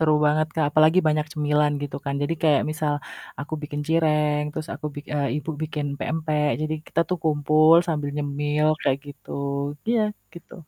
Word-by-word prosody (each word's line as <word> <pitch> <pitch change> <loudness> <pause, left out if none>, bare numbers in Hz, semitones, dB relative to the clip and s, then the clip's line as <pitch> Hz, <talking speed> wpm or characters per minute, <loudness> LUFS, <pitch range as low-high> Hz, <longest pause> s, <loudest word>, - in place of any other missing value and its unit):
Seru 155 -1 +4
banget 155 +1 +2
Kak, 155 -3 +2
apalagi 155 +4 +5
banyak 150 0 +1
cemilan 150 -1 +2
gitu 140 -1 -4
kan, 140 0 -2
jadi 155 +3 0
kayak 150 -4 +4
misal 155 -1 -1 0.5
aku 155 +2 -5
bikin 145 0 -4
cireng 150 -2 +2
terus 155 0 -5
aku - - -6 0.3
eee, 140 -1 +1
Ibu 150 +2 -4
bikin 150 -2 -3
pempek, 155 -1 0
jadi 155 0 -1
kita 165 - 0
tuh 180 - -1
kumpul 155 +1 +5
sambil 150 -4 -1
nyemil 145 +1 0 0.2
kayak 135 0 +2
gitu. 140 -1 -12 0.6
Iya 235 -1 +3 0.3
gitu. 170 - -12
150 Hz, 170 wpm, -24 LUFS, 145-155 Hz, 0.6 s, apalagi